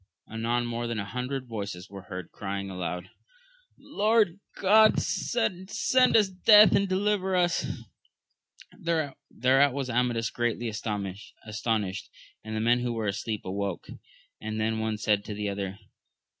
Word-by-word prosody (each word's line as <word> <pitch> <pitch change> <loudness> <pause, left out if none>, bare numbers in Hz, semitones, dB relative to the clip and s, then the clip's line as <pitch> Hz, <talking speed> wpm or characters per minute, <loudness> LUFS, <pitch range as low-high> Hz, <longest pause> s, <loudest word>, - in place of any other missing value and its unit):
Anon 115 +2 -1
more 120 0 -3
than 115 -1 -3
a 100 - -2
hundred 125 +3 -4
voices 100 -5 -5
were 100 0 -9
heard 90 -3 -7
crying 100 -1 -5
aloud, 90 0 -5 0.7
Lord 210 -3 +1 0.2
God 215 +3 +5
send 190 -6 -1
us 240 -3 +4
death 210 +3 +7
and 200 -1 +2
deliver 190 0 +1
us! 175 -2 +1 1.1
Thereat 140 - +1
was 135 -2 -2
Amadis 120 -2 0
greatly 120 0 -1
astonished; 105 0 -4 0.3
and 110 0 -5
the - - -1
men 120 +2 +3
who 120 -1 -2
were 115 -2 -3
asleep 105 +1 -3
awoke, 100 -1 -4 0.5
and 110 0 -4
the 110 +1 +1
one 110 0 -1
sMd 105 -1 +1
to 105 - -5
the 105 0 -2
other. 100 -1 -4
115 Hz, 135 wpm, -27 LUFS, 105-170 Hz, 1.1 s, death